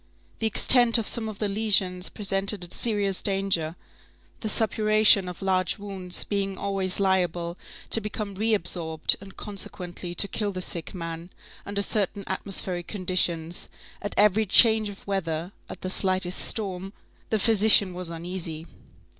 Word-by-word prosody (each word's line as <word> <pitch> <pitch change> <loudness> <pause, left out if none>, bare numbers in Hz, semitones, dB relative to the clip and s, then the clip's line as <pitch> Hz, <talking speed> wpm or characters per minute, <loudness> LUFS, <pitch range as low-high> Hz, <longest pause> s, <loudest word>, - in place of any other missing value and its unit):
The 225 - 0
extent 240 +2 +6
of 225 - -2
some 220 -2 0
of 215 - -8
the 210 - -1
lesions 195 -3 +1
presented 195 -1 -2
a 175 - -7
serious 205 -4 0
danger, 195 -5 0 0.6
the 220 - -3
suppuration 215 -2 +3
of 180 +2 -9
large 185 0 0
wounds 195 -3 -1
being 195 -2 -2
always 195 -2 -2
liable 175 -3 0 0.4
to 225 - +3
become 210 -1 -5
re 215 +3 +1
absorbed, 165 -4 +2
and 195 -1 -13
consequently, 180 -3 -5
to 200 - +7
kill 205 -1 -3
the 185 - -5
sick 170 +3 -2
man, 165 0 -6 0.4
under 200 0 0
certain 200 -1 -1
atmospheric 185 -2 -4
conditions; 175 -4 -1 0.3
at 205 - -5
every 210 +1 +3
change 220 +1 +5
of 200 - -12
weather, 175 -3 -3 0.2
at - - -9
the 185 - -4
slightest 185 -1 +1
storm, 195 -3 -3 0.4
the 220 - +1
physician 210 -3 +4
was 180 -1 -6
uneasy. 165 -1 -6
195 Hz, 145 wpm, -25 LUFS, 180-210 Hz, 0.6 s, to